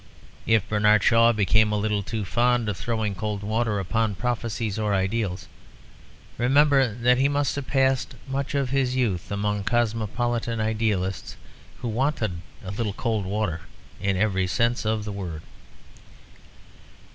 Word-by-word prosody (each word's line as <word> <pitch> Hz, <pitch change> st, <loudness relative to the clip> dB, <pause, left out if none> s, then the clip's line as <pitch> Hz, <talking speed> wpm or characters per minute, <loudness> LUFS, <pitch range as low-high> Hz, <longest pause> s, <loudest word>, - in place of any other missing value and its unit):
If 110 Hz, -3 st, +3 dB
Bernard 105 Hz, -1 st, +3 dB
Shaw 115 Hz, 0 st, +5 dB
became 105 Hz, 0 st, +3 dB
a 105 Hz, -, +1 dB
little 105 Hz, 0 st, 0 dB
too 105 Hz, +1 st, -4 dB
fond 120 Hz, +2 st, +1 dB
of 105 Hz, -, -2 dB
throwing 110 Hz, 0 st, -2 dB
cold 105 Hz, +1 st, -4 dB
water 110 Hz, 0 st, 0 dB
upon 110 Hz, +2 st, 0 dB
prophecies 115 Hz, -2 st, -2 dB
or 105 Hz, -2 st, +1 dB
ideals, 95 Hz, -1 st, -1 dB, 0.9 s
remember 135 Hz, 0 st, +4 dB
that 125 Hz, +1 st, +3 dB
he 135 Hz, -, +4 dB
must 145 Hz, 0 st, 0 dB
have 140 Hz, -2 st, -5 dB
passed 135 Hz, -1 st, +1 dB
much 135 Hz, 0 st, -3 dB
of 135 Hz, -3 st, 0 dB
his 130 Hz, -2 st, +1 dB
youth 105 Hz, -10 st, -1 dB
among 105 Hz, 0 st, -1 dB
cosmopolitan 115 Hz, +1 st, -1 dB
idealists 110 Hz, -4 st, -1 dB, 0.5 s
who -, -, -1 dB
wanted 115 Hz, -, -1 dB, 0.2 s
a 95 Hz, -, -4 dB
little 105 Hz, 0 st, -2 dB
cold 110 Hz, -3 st, -1 dB
water 95 Hz, -5 st, -2 dB, 0.4 s
in 95 Hz, -1 st, 0 dB
every 95 Hz, -2 st, +1 dB
sense 120 Hz, +4 st, 0 dB
of 110 Hz, -1 st, 0 dB
the 105 Hz, -, -4 dB
word. 90 Hz, -6 st, -6 dB
110 Hz, 145 wpm, -25 LUFS, 100-120 Hz, 0.9 s, Shaw